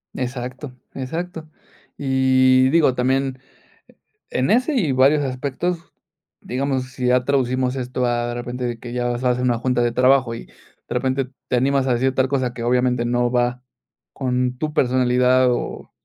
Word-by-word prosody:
Exacto, 125 +2 -5 0.2
exacto. 160 +4 -5 0.5
Y 130 -1 +3
digo, 150 -4 +3
también 130 +1 0 0.9
e - - -2
en 130 +9 +1
ese 255 +7 +2
y 180 - +1
varios 135 +3 +4
aspectos, 140 +6 -3 0.5
digamos, 130 +1 -2
si 125 -1 -3
ya 125 0 +3
traducimos 130 -2 0
esto 125 -1 -2
a, 120 0 0
de 120 - -3
repente, 125 +1 -4
de 120 -1 -3
que 120 0 -8
ya 125 0 -1
vas 120 +1 -2
a 125 - +3
hacer 125 +1 -1
una 120 -2 +2
junta 125 +1 0
de 120 0 +1
trabajo 125 -1 +3
y, 115 - -9
de - - -23 0.4
repente, 130 +1 -1 0.2
te - - 0
animas 135 +2 +2
a 125 - +2
decir 130 +2 +1
tal 130 0 +2
cosa 130 -3 -1
que, 120 - -6
obviamente, 125 0 +1
no 120 0 +1
va 125 0 0 0.5
con 125 -1 -1
tu 155 +2 -3
personalidad 125 0 +3
o 120 - -4
130 Hz, 170 wpm, -21 LUFS, 125-135 Hz, 0.9 s, varios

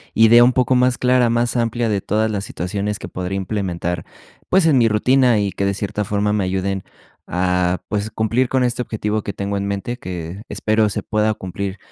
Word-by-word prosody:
idea 115 +2 +7
un 125 +1 +4
poco 125 0 +2
más 125 0 +3
clara, 125 -1 +3
más 120 +1 0
amplia 120 0 0
de 105 -3 0
todas 110 +2 0
las 100 -1 -3
situaciones 100 +4 -3
que - - -8
podría 90 +1 -4
implementar, 90 -4 -3 0.4
pues 190 -2 +4
en 150 -5 +4
mi 115 - +4
rutina 125 +2 +3
y 100 -1 0
que 100 - -2
de 100 0 0
cierta 105 +1 -3
forma 105 +1 0
me 105 -2 +1
ayuden 95 +1 -2 0.4
a, 90 0 0
pues, 105 +1 -1
cumplir 115 +4 0
con 130 -1 +1
este 125 0 0
objetivo 110 -2 -2
que 100 - -5
tengo 100 0 -3
en 100 0 -2
mente, 100 +5 -3
que 90 0 -6
espero 110 0 +1
se - - -4
pueda 110 0 0
cumplir 95 0 -5
105 Hz, 200 wpm, -20 LUFS, 95-120 Hz, 0.4 s, idea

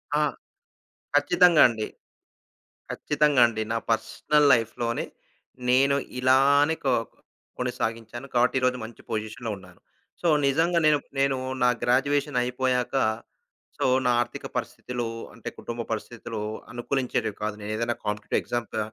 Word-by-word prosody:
ఆ! 150 - +3 0.9
ఖచ్చితంగా 170 +3 +5
అండి. 110 -3 -3 1.0
ఖచ్చితంగా 150 -3 +2
అండి. 110 -2 -3
నా - - 0
పర్సనల్ 150 +6 +2
లైఫ్‌లోనే 115 0 -1 0.7
నేను 135 +2 +4 0.2
ఇలానే 140 +4 +4
కొ 135 - +3 0.7
కొనసాగించాను 115 +4 -3
కాబట్టి 120 - +3
ఈరోజు 125 0 +2
మంచి 110 +1 -11
పొజిషన్‌లో 110 +1 -4
ఉన్నాను. 90 -2 -16 0.4
సో, - - -2 0.2
నిజంగా 165 +5 +2
నేను 150 -1 +5 0.2
నేను 135 -1 +2 0.3
నా 125 - +5
గ్రాడ్యుయేషన్ 140 +2 +1
అయిపోయాక 125 +1 -1 0.8
సో, - - +1 0.2
నా 125 - +4
ఆర్థిక 120 0 -4
పరిస్థితులు 120 -1 -3 0.3
అంటే - - -7
కుటుంబ 120 0 -5
పరిస్థితులు 115 0 -5 0.3
అనుకూలించేటివి 120 -3 -2
కాదు. 105 0 -1
నేనేదైనా 110 +3 -2
కాంపిటీటివ్ 105 0 -1
ఎగ్జామ్స్ 120 -2 -4
క - - 0
125 Hz, 115 wpm, -26 LUFS, 115-140 Hz, 1.0 s, ఖచ్చితంగా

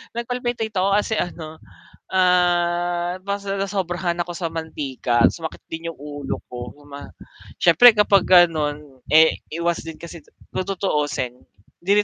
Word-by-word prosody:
nag-palpitate 240 -2 -3
ako 190 +2 +2
kasi 210 +1 0
ano, 160 -3 -5 0.5
ah, 175 -1 +2
parang 200 0 -3
nasobrahan 180 -3 -2
ako 175 - -7
sa 170 -1 -3
mantika 140 -7 -1
sumakit 160 -2 -7
din 165 +1 -6
yung - - -25
ulo 145 -1 -6
ko 120 0 -7
uma 145 0 -10 0.5
syempre 225 +8 +7
kapag 200 -2 +4
ganon, 150 -6 +3
eh 160 +2 +5 0.2
iwas 170 0 0
din 165 -1 -7
kasi 170 0 -9 0.3
kung 185 - -3
tutuusin 150 -10 -2 0.4
hindi 200 +4 +2
175 Hz, 130 wpm, -22 LUFS, 155-195 Hz, 0.5 s, syempre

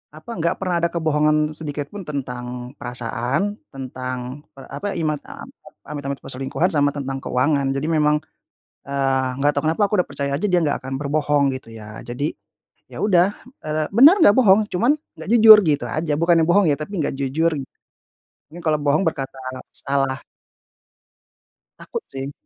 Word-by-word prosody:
apa 155 +9 -14
enggak 170 -1 0
pernah 180 -3 0
ada 170 - +2
kebohongan 155 -2 +1
sedikit 150 -2 -5
pun 200 -5 -8
tentang 125 -3 -5
perasaan, 125 - -2
tentang 130 +1 -6
per 135 - -12
apa, 195 +9 -4
imat 155 -3 -1 0.7
amit 145 -1 -6
amit 140 -1 -3
perselingkuhan, 135 +7 -1
sama 145 -1 +2
tentang 135 -1 -4
keuangan, 135 +1 0
jadi 140 +3 -2
memang, 150 -1 +3 0.7
eee, 135 -1 0
enggak 145 +1 +2
tahu - - +1
kenapa 185 +6 +1
aku - - -7
udah - - -9
percaya 140 -1 -3
aja 210 - -2
dia 180 - +3
enggak 145 - +1
akan 130 +1 -6
berbohong 145 -1 +1
gitu 130 -3 -8
ya, 110 0 -10
jadi 135 +6 -3 0.6
ya - - -9
udah, 190 0 +3 0.3
eee, 155 0 -1
benar 300 - +7
nggak 205 - +7
bohong, 215 -3 +5
cuman 235 +10 +2 0.2
nggak 160 +3 -8
jujur 220 -2 +10
gitu 150 -3 +1
aja, 155 -1 -1
bukannya 170 0 +3
bohong 195 +4 +4
ya 145 - +3
tapi 170 +4 -4
nggak 145 - -2
jujur. 150 +5 0 1.0
Nye 175 - -8
kalau 155 -2 +1
bohong 150 +5 +2
berkata 135 -4 -3 0.4
salah. 135 -1 0 1.6
Takut 470 - -6
sih. 135 +1 -6
150 Hz, 160 wpm, -21 LUFS, 135-170 Hz, 1.6 s, jujur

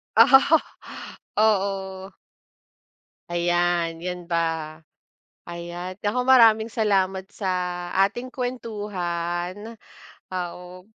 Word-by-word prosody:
Ah, 270 +7 +7 0.8
oo. 195 -2 0 1.2
Ayan 175 -1 0
yan 180 0 -5
ba, 170 0 -1 1.1
ayan, 175 +2 -7
naku 245 +5 0
maraming 225 -3 +5
salamat 195 -3 0
sa 200 -2 -6 0.6
ating 245 +5 -8
kuwentuhan, 205 -5 -4 0.6
ah, 180 -2 -3
o 180 +1 -12
190 Hz, 75 wpm, -24 LUFS, 175-220 Hz, 1.2 s, Ah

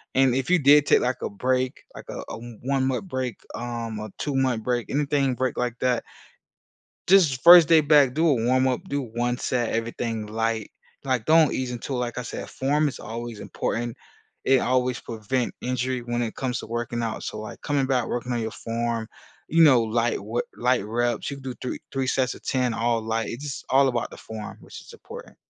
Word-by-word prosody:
And 130 -2 +4
if 135 +3 -1
you 180 - +5
did 145 +1 +6
take, - - +4
like, 125 0 -1
a - - -2
break, 130 +4 -1
like, - - -10
a - - -5
a - - -5 0.3
one-month 130 0 0
break, 130 -4 -3 0.2
um, 115 -2 -4
a 110 0 -6
two-month 130 -5 0
break, 120 -2 -1
anything 145 0 +1
with - - -1
a - - -5
break 130 -2 -1
like 125 -1 -1
that" 125 -2 +1 1.0
"just 185 -6 +6
the 130 - -3
first 170 -2 +10
day 160 -2 +6
back, 145 -4 +5
do 165 +2 +2
a 145 - +5
warm 130 +2 +2
up. 130 +7 -1
Do 140 0 -1
1 120 +1 -2
set, 120 -4 -1
everything 115 -1 -3
light. 110 0 -2 0.3
Like, 130 -4 -1
don't 160 -1 +5
ease 130 -1 -2
into 125 +3 -5
it." - - -1
Like 120 -1 -3
I 125 - -2
said, - - -6
form 145 +3 +1
is 140 - -5
always 115 0 -6
important. 120 0 -3 0.5
It 135 -1 +5
always 125 0 +1
prevent 115 +2 -3
injury 125 0 -1
when 120 0 -2
it 115 - -3
comes 125 -2 -2
to - - -8
working 120 +1 -3
out. 115 -1 -3
So, - - -5
like, 110 - -8
coming 145 -2 0
back, 130 -3 0
working 125 +1 -3
on 120 - -1
your 110 0 -3
form, 115 -1 -3 0.4
you 165 +1 +5
know, 130 -6 +7
light 115 -1 0
we 115 +4 -1 0.2
light 125 -3 +1
reps. 120 +1 -1
You 140 - -5
can 135 - -13
do 130 -2 -5
three 125 - -4
three 135 -1 -1
sets 130 -1 +1
of - - -15
10 125 -2 0
all 115 0 0
light. 110 0 -2
It's 125 +5 -6
just 140 -3 -6
all 135 +1 +5
about 120 -2 -2
the - - -10
form, 110 -1 -8
which - - -11
is - - -14
important. - - -11
125 Hz, 215 wpm, -25 LUFS, 115-135 Hz, 1.0 s, first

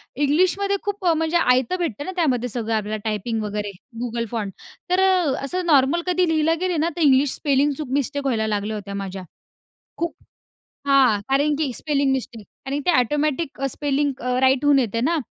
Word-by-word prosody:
इंग्लिशमध्ये 365 +8 +2
खूप 405 -2 -4
अ, 340 - +5
म्हणजे 320 +1 +1
आयतं 255 -1 +2
भेटतं 290 - -3
ना, - - -4
त्यामध्ये 250 -8 +1
सगळं 230 -1 -3
आपल्याला 215 0 -2
टायपिंग 220 +1 -2
वगैरे 210 0 -3 0.3
Google 235 -1 -2
फॉन्ट, 210 -5 -3 0.4
तर 365 +1 +2
अ, 365 -6 +3
असं 360 +6 -2
नॉर्मल 290 +2 +4
कधी 360 0 +2
लिहिला 320 0 +2
गेले 365 -2 0
ना, 320 +2 +1
तर - - -2
इंग्लिश 275 -2 +4
स्पेलिंग 285 0 +2
चूक, 300 -4 -5
मिस्टेक 285 +1 -1
व्हायला 225 -5 0
लागल्या 210 0 -2
होत्या 200 -1 -7
माझ्या. 195 -1 -5 0.7
खूप 340 0 -3 0.7
हां, 265 -7 +4
कारण 285 +3 +2
की 295 -5 -1
स्पेलिंग 280 -3 0
मिस्टेक 245 -5 -4 0.2
आणि 280 +2 -2
ते - - +5
ऑटोमॅटिक 295 +3 -1
अ, 275 - 0
स्पेलिंग 285 +1 0
अ, 250 +1 -1
राईट 265 +1 +3
होऊन 290 -1 +5
येते 230 -3 0
ना, 330 +7 +1
275 Hz, 185 wpm, -22 LUFS, 235-320 Hz, 0.7 s, अ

